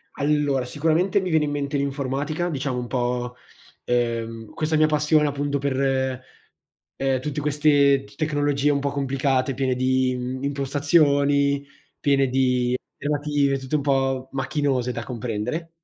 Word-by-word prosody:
Allora 145 -3 +1
sicuramente 165 +8 +1
mi 185 - -3
viene 160 -2 +3
in 145 - -3
mente 145 0 -2
l'informatica, 140 +4 -2
diciamo, 135 -4 -2
un 125 -1 -3
po', 125 -1 -2 0.5
ehm, 115 -2 -1
questa 155 0 -1
mia 155 0 +5
passione 150 0 +3
appunto 145 0 -1
per, 130 -1 0 0.8
ehm, 135 -1 0
tutte 150 +1 -3
queste 145 -2 +3
t 135 - -17
tecnologie 145 -2 +1
un 140 -1 0
po' 140 - -1
complicate, 135 -1 0
piene 130 0 0
di, 130 0 +1
mhmm, 130 +2 -4
impostazioni, 140 0 +2 0.3
piene 135 -1 +2
di 125 -1 +1 0.2
alternative, 145 -1 0
tutte 130 +3 -3
un 145 - -2
po' 135 -2 0
macchinose 135 -3 0
da 115 -1 -5
comprendere. 125 +6 -4
140 Hz, 140 wpm, -23 LUFS, 130-145 Hz, 0.8 s, mia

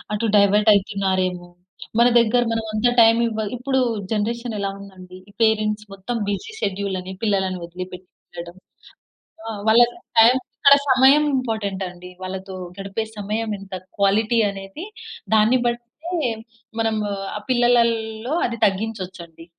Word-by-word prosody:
అటు 225 +2 -1
డైవర్ట్ 205 +2 +5
అయితున్నారేమో. 185 -3 -1 0.5
మన 240 - +6
దగ్గర 235 +1 +3
మనం 225 -1 -2
అంత 215 +3 +2
టైమ్ 225 0 +6
ఇవ్వాల్ 220 -2 -3
ఇప్పుడు 265 +2 0 0.3
జనరేషన్ 230 +2 -2
ఎలా 200 - -1
ఉందండి? 185 -2 -12
ఈ - - -15
పేరెంట్స్ 215 -1 +1
మొత్తం 195 +5 -5
బిజీ 300 - -4
షెడ్యూల్ 195 -1 -2
అని 185 +1 -8
పిల్లలను 190 -3 0
వదిలి 180 +2 -7
పెట్టి 180 0 -11 0.3
వెళ్ళడం. 170 +1 -7 0.9
ఆ! - - -3 0.2
వాళ్ళ 225 +2 +6 0.4
టైమ్ 235 +3 +7 0.2
ఇక్కడ 280 0 +7 0.2
సమయం 265 +3 +6
ఇంపార్టెంట్ 220 -6 -3
అండి. 180 0 -12
వాళ్ళతో 190 +1 -6 0.2
గడిపే 195 +3 -3
సమయం 215 +2 -3
ఎంత 195 -1 -12 0.2
క్వాలిటీ 215 +4 +2
అనేది 195 - -8 0.5
దాన్ని 220 +3 +4
బట్టే, 240 0 0 1.0
మనం 225 -1 +1 0.4
ఆ - - -5
పిల్లలల్లో 235 -1 +1
అది 235 -1 -3
తగ్గించొచ్చండి. 190 -5 -4
210 Hz, 130 wpm, -22 LUFS, 190-230 Hz, 1.0 s, టైమ్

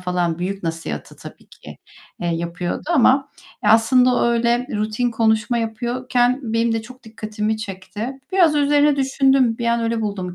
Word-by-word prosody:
falan 180 -2 -1
büyük 195 +2 -4
nasihatı, 165 - -5
tabii - - -13
ki, - - -13 0.4
eee, 175 - -2
yapıyordu 170 +1 -3
ama 270 0 +4 0.4
ya, 210 - +4
aslında 250 +3 +4
o - - +1
öyle 235 +1 +1
rutin 215 +3 -1
konuşma 225 +1 +1
yapıyorken 245 +3 0
benim 230 0 0
de 225 -1 -2
çok 255 +3 -14
dikkatimi 215 -1 -3
çekti. 205 +2 -6 0.2
Biraz 350 -5 +4
üzerine 290 0 +3
düşündüm. 270 -3 +2
Bir 235 - -2
an 235 0 +1
öyle 230 0 -1
buldum 195 -4 -4
230 Hz, 155 wpm, -20 LUFS, 210-250 Hz, 0.4 s, ama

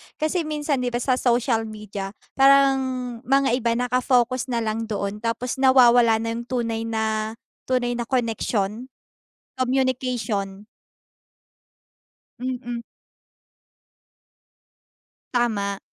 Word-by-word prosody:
kasi 315 +1 -1
minsan 295 -2 -1
di 250 - -1
ba - - 0
sa 255 0 +1
social 235 -2 +1
media, 210 -2 -7 0.2
parang 275 0 +6 0.5
mga 275 +1 +3
iba 235 -2 +1
nakafocus 250 +1 +1
na 235 -2 -1
lang 220 +1 -2
doon, 200 -1 -3
tapos 235 +3 -3
nawawala 245 -3 +6
na 230 0 -2
yung 235 +1 -5
tunay 230 -3 -2
na 220 0 -1 0.3
tunay 250 -1 +1
na 240 -1 -3
connection, 230 -2 -1 0.7
communication. 245 -6 -1 1.7
Mm. 245 -2 -4 2.5
Tama. 205 -5 0
240 Hz, 100 wpm, -23 LUFS, 220-255 Hz, 2.5 s, parang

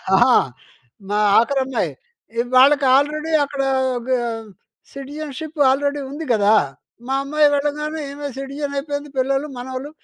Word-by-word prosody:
ఆహా! 245 +4 +6 0.7
మా 205 - 0 0.2
ఆఖరమ్మాయి. 265 +1 0 0.5
ఇ - - +5 0.2
వాళ్ళకి 280 +1 +6
ఆల్రెడీ 305 +3 0
అక్కడ 280 -1 -4 0.4
ఆహ్, 235 -3 -2 0.5
సిటిజన్షిప్ 295 +2 -7
ఆల్రెడీ 285 +1 0
ఉంది 300 +3 -6
కదా! 210 0 +4 0.5
మా 270 - 0
అమ్మాయి 300 +1 +3
వెళ్ళగానే 300 +2 -2
ఈమె 285 0 -6
సిటిజన్ 280 +1 -5
అయిపోయింది. 285 0 -4
పిల్లలు 270 +3 0
మనవలు 260 +3 -6
280 Hz, 120 wpm, -20 LUFS, 260-295 Hz, 0.7 s, ఆహా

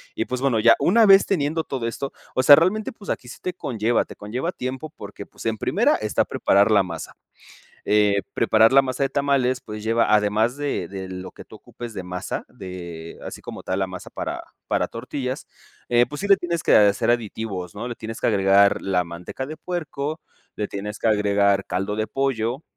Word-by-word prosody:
Y - - -1
pues 125 0 -4
bueno, 130 -5 +2
ya 115 +1 +6
una 220 +5 +5
vez 195 0 +7
teniendo 160 -3 0
todo 130 -6 -3
esto, 135 +4 -4 0.2
o 130 - +1
sea, 145 +2 +10
realmente 195 +6 +1
pues 210 -3 -13
aquí - - -3
sí - - -9
te 180 - -3
conlleva, 120 - 0
te - - -12
conlleva 125 +11 -3
tiempo 130 +1 -5
porque, 100 0 -9
pues - - -13
en 110 -1 0
primera - - +2
está - - 0
preparar 100 +2 +3
la 100 -2 +5
masa. 85 -3 -7 0.7
Eh, 105 -1 +3
preparar 115 +1 +4
la 135 - +8
masa 130 0 -3
de 135 - +1
tamales, 135 -3 +1
pues 105 -3 -8
lleva, 115 0 +2
además 105 +4 +2
de 145 -12 -2
de 95 -1 -6
lo 95 0 -7
que - - -12
tú - - -13
ocupes 120 -2 -9
de 95 - -5
masa, 90 0 -5
de 85 -3 -9
así - - -8
como - - -8
tal 95 - -2
la 95 - +1
masa 90 -1 -8
para - - -5 0.3
para - - +1
tortillas, 130 +2 -5 0.4
eh, 120 0 +4
pues 150 +5 -7
sí - - -1
le 195 - +7
tienes 170 -2 -2
que - - +4
hacer 105 +2 +4
aditivos, 105 -6 -3
¿no? 110 +4 -5
Le 120 - -4
tienes 110 0 -7
que - - 0
agregar 100 -1 +4
la 90 -2 0
manteca 85 +9 -7
de 155 +2 -7
puerco, 155 -3 -4 0.4
le 105 - -2
tienes 105 +1 -6
que - - +1
agregar 100 -2 +2
caldo 95 +3 -2
de 110 0 -1
pollo 130 +1 -1
115 Hz, 205 wpm, -23 LUFS, 100-135 Hz, 0.7 s, sea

